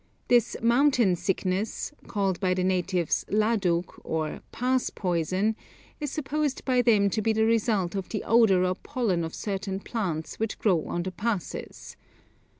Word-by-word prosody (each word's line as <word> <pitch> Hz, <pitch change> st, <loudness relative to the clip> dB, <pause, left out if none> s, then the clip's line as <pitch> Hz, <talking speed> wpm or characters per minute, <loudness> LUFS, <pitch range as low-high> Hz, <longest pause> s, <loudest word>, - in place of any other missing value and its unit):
This 240 Hz, -2 st, +3 dB
'mountain 240 Hz, -5 st, +4 dB
sickness,' 185 Hz, -, -2 dB, 0.2 s
called 195 Hz, -4 st, -1 dB
by 185 Hz, -2 st, +1 dB
the 185 Hz, -, 0 dB
natives 180 Hz, -2 st, 0 dB
ladug, 205 Hz, -5 st, +2 dB, 0.2 s
or 155 Hz, -1 st, -3 dB
'pass 255 Hz, +1 st, 0 dB
poison,' 185 Hz, +4 st, 0 dB, 0.4 s
is 295 Hz, -2 st, -2 dB
supposed 295 Hz, -1 st, -2 dB
by 255 Hz, -2 st, +3 dB
them 215 Hz, -5 st, +4 dB
to 215 Hz, -, 0 dB
be 220 Hz, +1 st, +2 dB
the 220 Hz, 0 st, +2 dB
result 220 Hz, -5 st, +1 dB
of 195 Hz, -2 st, -4 dB
the 210 Hz, -, -3 dB
odour 220 Hz, -6 st, +4 dB
or 185 Hz, -, +1 dB
pollen 205 Hz, -6 st, -1 dB
of 160 Hz, -, -5 dB
certain 195 Hz, -1 st, -3 dB
plants 185 Hz, -8 st, -4 dB
which 220 Hz, 0 st, -2 dB
grow 180 Hz, -7 st, +2 dB
on 175 Hz, -, -2 dB
the 185 Hz, -, -4 dB
passes. 205 Hz, 0 st, -4 dB
200 Hz, 150 wpm, -27 LUFS, 180-230 Hz, 0.4 s, mountain